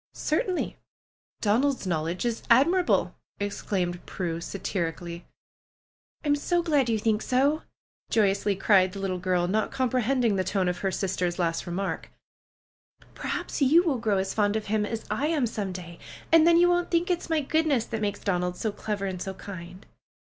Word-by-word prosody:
"Certainly, 355 +4 -1 0.6
Donald's 250 +4 +2
knowledge 170 +2 -1
is 235 -2 -1
admirable!" 335 +10 +4 0.3
ex 205 0 -3
claimed 175 -3 -2
Prue 170 -3 -3
satirically. 170 -2 -4 1.0
"I'm 290 -1 +3
so 345 +4 0
glad 290 -7 +2
you 225 - +2
think 215 0 +1
so!" 280 +5 +2 0.5
joyously 200 -1 +2
cried 190 -1 +4
the 200 - -6
little 190 -2 -2
girl, 180 -1 +1
not 215 +4 0
comprehending 255 -3 +1
the 185 - +1
tone 185 0 0
of 180 0 -1
her 195 - 0
sister's 180 -2 -1
last 170 -1 -1
remark. 190 +3 -3 1.0
"Perhaps - - -4
you 310 +6 +6
will 295 -8 0
grow 215 -3 +1
as 190 0 -1
fond 205 -1 +1
of 220 -1 -2
him 210 0 0
as 225 0 -4
I 290 - 0
am 310 -5 +1
some 210 -4 -3
day, 175 -2 -8 0.3
and 325 0 +7
then 340 0 +6
you 350 +1 +6
won't 350 0 +1
think 345 +1 +1
it's 350 -1 -2
my 320 -2 +2
good 315 +3 +1
ness 260 -6 +2
that 225 -2 -4
makes 205 -1 -2
Donald 180 -2 -1
so 220 - -1
clever 205 -1 -3
and 185 -2 -4
so 190 0 -4
kind." 185 -1 -9
210 Hz, 175 wpm, -27 LUFS, 185-270 Hz, 1.0 s, and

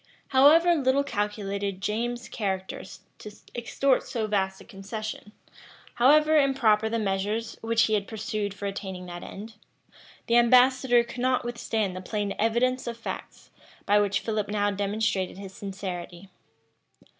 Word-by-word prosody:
However 310 +6 +6
little 275 -3 +2
calculated 200 -4 -3
James's 235 +4 -2
character 190 -3 -3 0.4
to 210 - -9 0.2
extort 255 +3 +1
so 225 -3 -3
vast 190 -2 -1
a - - -12
concession; 210 +1 -7 0.6
however 305 +5 +5
improper 225 -6 +3
the 230 - -1
measures 210 +2 -2
which 225 0 +2
he 220 - +1
had 205 -2 0
pursued 215 -2 -3
for 200 - -7
attaining 190 -2 -5
that 175 -1 -8
end; 220 +2 -9 0.7
the 235 - +3
ambassador 250 0 +5
could 235 +1 -9
not 255 -1 +1
withstand 225 -5 -2
the 185 - -5
plain 205 +1 -2
evidence 240 +4 +1
of 235 -1 -4
facts, 230 - -8 0.3
by 205 +1 +4
which 205 -1 +1
Philip 215 -2 -2
now 205 0 +1
demonstrated 200 -2 -1
his 195 -1 -9
sincerity. 190 -2 -7
215 Hz, 140 wpm, -26 LUFS, 200-240 Hz, 0.7 s, However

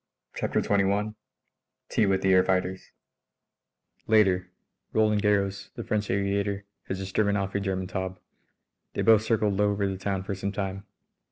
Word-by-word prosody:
CHAPTER - - 0
XXI 100 +1 +1 0.7
TEA 105 - +2
WITH 95 -1 +1
THE 95 0 +4
AIR 95 0 +6
FIGHTERS 95 0 -1 1.2
Later: 95 -5 +3 0.4
Roland 105 -1 +3
Garros, 100 -1 +1
the - - -5
French 105 -1 -1
aviator, 100 0 0 0.2
has 95 - -2
just 95 0 -6
driven 100 -1 +2
off 95 -1 -2
a 100 - +1
German 95 -1 -2
Taube. 95 0 -4 0.8
They - - 0
both 110 -2 +6
circled 110 -2 +1
low 105 0 +3
over 100 0 0
the 95 -1 -4
town 95 -1 -2
for 100 - -3
some 100 +1 -3
time. 100 -1 -4
100 Hz, 160 wpm, -27 LUFS, 95-105 Hz, 1.2 s, AIR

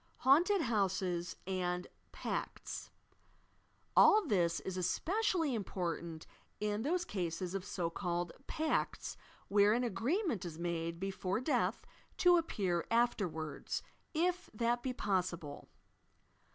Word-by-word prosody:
HAUNTED 345 +9 +6
HOUSES 190 - 0
AND 180 -1 -1 0.3
"PACTS" - - -4 1.1
AH 430 - +8
this 175 - +2
is 190 - -4
especially 325 - +1
important 170 -6 -3 0.3
in 210 0 0
those 345 +7 0
cases 180 - -3
of 195 -2 -2
so 175 -3 -2
called 175 -1 -2 0.2
"pacts," 315 0 -1 0.3
where 205 +1 +5
an 245 +2 +1
agreement 245 - 0
is 165 -3 -6
made 170 -1 -2
before 195 +1 -1
death 255 +5 0 0.3
to 355 -1 +6
appear 190 - 0
afterwards, 190 -10 0 0.3
if 355 +3 0
that 235 +2 +1
be 260 - -1
possible. 180 -9 -2
195 Hz, 110 wpm, -35 LUFS, 175-260 Hz, 1.1 s, AH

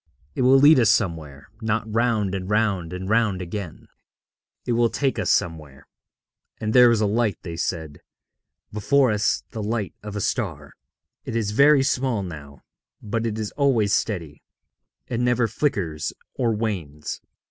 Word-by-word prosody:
It - - -3
will 130 +2 +6
lead 145 +1 +7
us 115 -3 +4
somewhere, 80 -10 -1
not 110 0 0
round 110 -3 0
and 95 -1 -4
round 100 -6 0
and 90 +1 -6
round 110 -3 +1
again 90 -1 -7 0.8
it 125 - -2
will 120 0 +3
take 135 -1 -1
us - - -1
somewhere. 75 -5 -2 0.7
And 110 0 -2
there 125 -1 +7
is 115 -2 +2
a - - +3
light,' 110 +1 0
they 85 -3 -6
said, 80 -3 -4 0.7
'before 130 +4 +2
us, 105 0 0
the 110 - -5
light 105 -1 -2
of 105 -1 -8
a - - -2
star. - - -3 0.5
It - - -6
is 110 -3 -1
very 140 +4 +5
small 130 -5 0
now, 70 -6 -10 0.4
but 115 +2 -2
it 110 -1 -3
is 110 -2 -4
always 120 -8 +1
steady; 85 -9 -2 0.7
it 120 - -3
never 125 -1 +2
flickers 85 - -2 0.2
or 120 -3 0
wanes. 90 -10 -4
105 Hz, 160 wpm, -23 LUFS, 90-120 Hz, 0.8 s, lead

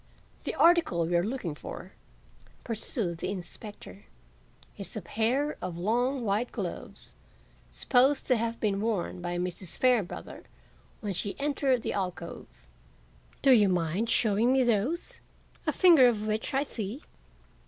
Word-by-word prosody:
"The - - -2
article 330 - +4
we 175 +2 -1
are 170 - +3
looking 215 - -3
for," 150 - -9 0.7
pursued 215 -6 -2
the - - -2
inspector, 190 - -8 0.7
"is - - -6
a - - -3
pair 260 +7 0
of 180 -2 -4
long, 240 +7 0
white 210 +4 0
gloves, - - -6 0.6
supposed 265 +2 +2
to 255 - +3
have 230 0 -2
been 200 -2 0
worn 205 -5 -2
by 175 0 -3
Mrs. 180 0 -4
Fairbrother 245 -7 0 0.6
when 205 -2 -3
she 195 +6 -3
entered 275 -4 +1
the - - -2
alcove. 180 -3 -4 1.0
Do 275 - +6
you 210 -6 +6
mind 180 +5 0
showing 225 +1 +3
me 265 0 +4
those, 240 - 0 0.5
a - - +4
finger 330 -9 +7
of 215 -3 0
which 215 +5 -1
I 275 - +3
see?" 230 -1 -4
220 Hz, 140 wpm, -29 LUFS, 185-255 Hz, 1.0 s, finger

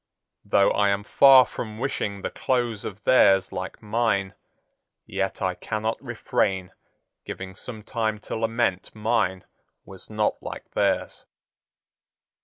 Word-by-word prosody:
Though 100 - +3
I 100 -1 +2
am 100 0 0
far 130 +3 +7
from 110 -2 -7
wishing 105 -6 -3
the - - -3
close 120 -5 -1
of 100 0 -7
theirs 95 -7 +5
like 95 +4 -6
mine, 105 -3 0 0.7
yet 95 0 -3
I 95 -1 +1
cannot 110 +4 -3
refrain 100 -6 -1 0.5
giving 95 0 -7
some 110 0 -8
time 110 -1 -1
to - - -5
lament 115 -4 -1
mine 105 -4 0 0.4
was 95 -1 -12
not 105 -1 -1
like - - -8
theirs." - - -1
105 Hz, 125 wpm, -25 LUFS, 95-115 Hz, 0.7 s, far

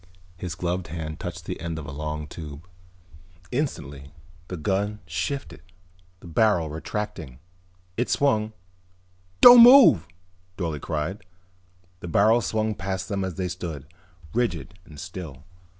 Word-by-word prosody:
His 85 -1 -6
gloved 90 0 -2
hand 80 0 -6
touched 90 -2 -6
the - - -5
end 85 -1 -4
of 80 - -6
a 70 - -7
long 75 +1 -4
tube. 75 +1 -9 0.8
Instantly 70 - -4 0.4
the 90 - -6
gun 100 +5 -1
shifted, 110 - -4 0.6
the - - -12
barrel 85 -3 +2
retracting. 80 -5 -5 0.6
It 120 - 0
swung 110 -6 +1 0.9
"Don't 245 -1 +11
move!" 235 - +8 0.5
Dorle 80 -5 -3
cried. 80 +5 -3 0.8
The 85 - -8
barrel 110 +7 +4
swung 110 +1 -1
past 95 0 -4
them 100 -2 -1
as 95 -3 -4
they 90 +2 -2
stood, 85 -6 -6 0.5
rigid 90 - -1
and 75 -2 -13
still. 85 -6 -8
90 Hz, 130 wpm, -25 LUFS, 80-105 Hz, 0.9 s, Don't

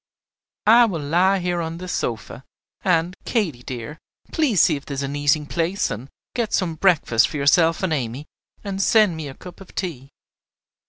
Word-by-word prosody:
I 235 +3 +7
will 185 -8 -2
lie 180 +6 +3
here 175 -1 -1
on 165 0 -4
this 180 +1 -5
sofa; 120 +2 -4 0.4
and, 175 0 +1
Katy 175 - -1
dear, 125 +5 -7 0.3
please 280 - +2
see 155 - +3
if 140 - -7
there 140 - -6
is 140 - -2
an 140 +1 -4
eating 145 +1 +2
place, 170 +6 -1
and 115 +6 -6 0.2
get 235 -3 -2
some 175 -3 +1
breakfast 160 -10 +3
for - - -6
yourself 165 +5 +3
and 180 -4 +1
Amy, 130 0 -3 0.4
and 195 -2 -3
send 210 -4 +4
me 155 -2 -5
a 135 - -9
cup 180 +1 -12
of 195 - -14
tea." 140 -8 -4
165 Hz, 180 wpm, -22 LUFS, 140-190 Hz, 0.4 s, I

